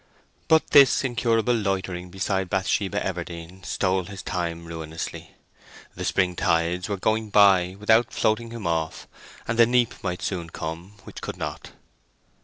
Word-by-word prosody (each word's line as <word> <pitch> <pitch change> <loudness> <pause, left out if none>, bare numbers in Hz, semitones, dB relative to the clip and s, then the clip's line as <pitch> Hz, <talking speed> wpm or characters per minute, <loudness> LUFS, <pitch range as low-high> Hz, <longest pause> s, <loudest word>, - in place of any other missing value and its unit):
But 160 0 +3
this 140 -1 +6
incurable 120 -2 +1
loitering 95 -4 -2
beside 95 0 -2
Bathsheba 100 +1 0
Everdene 85 0 -6
stole 95 -1 0
his 100 -1 -8
time 85 -2 -3
ruinously. 80 -1 -7 0.6
The - - -6
spring 90 -2 +1
tides 85 +1 0
were 100 - -1
going 110 +3 0
by 95 -3 +5
without 110 +2 +3
floating 110 +2 0
him 115 -2 -7
off, 80 -2 -2 0.4
and 115 +1 -2
the 115 - +7
neap 120 -1 +2
might 90 -2 -3
soon 85 -4 -3
come 85 +4 -6
which - - -10
could - - -6
not. - - -6
95 Hz, 145 wpm, -25 LUFS, 85-110 Hz, 0.6 s, the